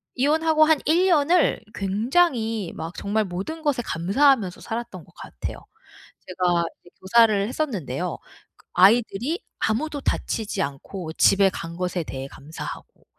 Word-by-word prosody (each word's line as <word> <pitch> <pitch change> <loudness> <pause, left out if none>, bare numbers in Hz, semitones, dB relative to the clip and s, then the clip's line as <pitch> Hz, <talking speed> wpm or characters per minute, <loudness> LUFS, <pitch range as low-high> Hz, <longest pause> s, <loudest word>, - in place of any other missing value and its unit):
이혼하고 310 +3 +3
한 315 -2 +3
1 340 +5 +3
년을 330 -2 +3
굉장히 225 - +1
막 165 +2 -6
정말 215 +2 0
모든 195 - -5
것에 290 -5 0
감사하면서 200 - +2
살았던 225 -7 -6
것 - - -23
같아요. - - -7 0.7
제가 180 -2 +1 0.2
이제 175 - -18
교사를 210 0 +4
했었는데요. 250 - -3 0.4
그 - - -26
아이들이 230 - +3 0.2
아무도 285 +6 -1
다치지 220 -5 -2
않고 160 +5 -6
집에 195 +2 +5
간 170 -1 -7
것에 180 -2 -2
대해 135 -1 -6
감사하고 145 +4 -9
215 Hz, 295 characters per minute, -24 LUFS, 180-285 Hz, 0.7 s, 집에